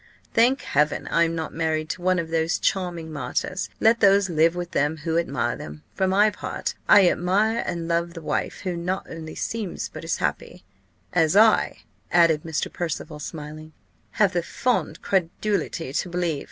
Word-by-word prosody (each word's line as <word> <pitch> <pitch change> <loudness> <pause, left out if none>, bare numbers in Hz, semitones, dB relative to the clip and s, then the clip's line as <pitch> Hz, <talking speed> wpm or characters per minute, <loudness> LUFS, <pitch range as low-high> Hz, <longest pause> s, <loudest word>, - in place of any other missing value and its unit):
Thank 245 +4 +4
Heaven! 150 +2 0
I 170 - +3
am 165 0 -2
not 160 -1 -4
married 160 -1 -1
to 180 - -4
one 185 +1 +2
of 165 -2 -2
these 165 +1 +1
charming 175 -4 -2
martyrs. 185 +5 -3
Let 230 +1 +4
those 200 -1 +4
live 165 +1 +3
with 175 -1 -5
them 150 +3 0
who 165 -1 0
admire 125 -8 -1
them. 75 0 -9
For 190 - 0
my 205 +3 +4
part, - - -4 0.2
I 200 -3 +8
admire 205 +7 +2
and 170 -1 -3
love 170 +1 -1
the 165 - -7
wife, - - -2
who 185 -2 -3
not 180 +3 -3
only 160 -1 -8
seems 220 -6 -4
but - - -9
is - - -1
happy - - -3 0.5
as 165 0 +3
I," 220 +1 +4 0.3
added 165 -3 +4
Mr. 160 -1 -3
Percival 160 -2 -4
smiling, 155 0 -8 0.4
"have 200 -3 +3
the 175 - +1
fond 250 +8 -1
credulity 185 -4 -1
to 175 - -1
believe. 175 -4 -1
170 Hz, 175 wpm, -24 LUFS, 160-190 Hz, 0.5 s, I